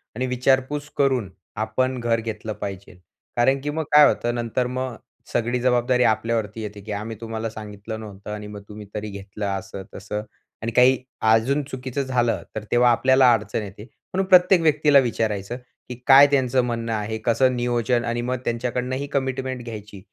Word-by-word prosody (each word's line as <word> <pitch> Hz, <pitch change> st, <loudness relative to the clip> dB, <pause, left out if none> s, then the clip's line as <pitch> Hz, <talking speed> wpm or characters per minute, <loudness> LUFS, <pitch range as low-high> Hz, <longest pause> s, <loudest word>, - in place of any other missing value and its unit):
आणि 125 Hz, +3 st, -1 dB
विचारपूस 130 Hz, +3 st, 0 dB
करून 130 Hz, -8 st, +1 dB, 0.3 s
आपण 130 Hz, +4 st, -1 dB
घर 115 Hz, -1 st, +1 dB
घेतलं 110 Hz, -1 st, -5 dB
पाहिजे, 100 Hz, -1 st, -7 dB, 0.4 s
कारण 135 Hz, +3 st, +3 dB
की 145 Hz, -, -3 dB
मग 160 Hz, +2 st, -2 dB
काय 150 Hz, -1 st, +8 dB
होतं, 120 Hz, 0 st, 0 dB
नंतर 120 Hz, +1 st, -1 dB
मग 130 Hz, 0 st, -3 dB, 0.4 s
सगळी 120 Hz, +2 st, 0 dB
जबाबदारी 125 Hz, 0 st, +2 dB
आपल्यावरती 110 Hz, -1 st, 0 dB
येते, 105 Hz, -1 st, -7 dB
की 105 Hz, +2 st, -8 dB
आम्ही 105 Hz, +2 st, -4 dB
तुम्हाला 115 Hz, 0 st, -4 dB
सांगितलं 110 Hz, 0 st, -8 dB
नव्हतं 105 Hz, -1 st, -9 dB
आणि 105 Hz, 0 st, -6 dB
मग 105 Hz, -1 st, -8 dB
तुम्ही 105 Hz, 0 st, -9 dB
तरी 105 Hz, 0 st, -4 dB
घेतलं, 100 Hz, +1 st, -7 dB
असं-तसं. 100 Hz, +1 st, -5 dB, 0.4 s
आणि 115 Hz, -, -2 dB
काही 125 Hz, +3 st, +5 dB, 0.3 s
अजून 130 Hz, +6 st, +2 dB
चुकीचं 130 Hz, 0 st, -4 dB
झालं, 125 Hz, -3 st, 0 dB
तर 110 Hz, -, -4 dB
तेव्हा 120 Hz, 0 st, +5 dB
आपल्याला 130 Hz, +1 st, +5 dB
अडचण 110 Hz, 0 st, -2 dB
येते, 100 Hz, +1 st, -9 dB
म्हणून 185 Hz, -, -5 dB
प्रत्येक 180 Hz, -1 st, +6 dB
व्यक्तीला 150 Hz, -2 st, +5 dB
विचारायचं, 110 Hz, -3 st, -1 dB, 0.3 s
की 125 Hz, -, -5 dB
काय 140 Hz, +1 st, +9 dB
त्यांचं 130 Hz, -2 st, +2 dB
म्हणणं 115 Hz, -1 st, -2 dB
आहे, 110 Hz, 0 st, -2 dB
कसं 125 Hz, +2 st, +3 dB
नियोजन 120 Hz, 0 st, 0 dB
आणि 120 Hz, +1 st, -1 dB
मग 125 Hz, +1 st, -2 dB
त्यांच्याकडनं 125 Hz, +2 st, -2 dB
ही 140 Hz, +2 st, -4 dB
कमिटमेंट 130 Hz, -2 st, -2 dB
घ्यायची, 105 Hz, -3 st, -8 dB
120 Hz, 165 wpm, -23 LUFS, 110-130 Hz, 0.4 s, काय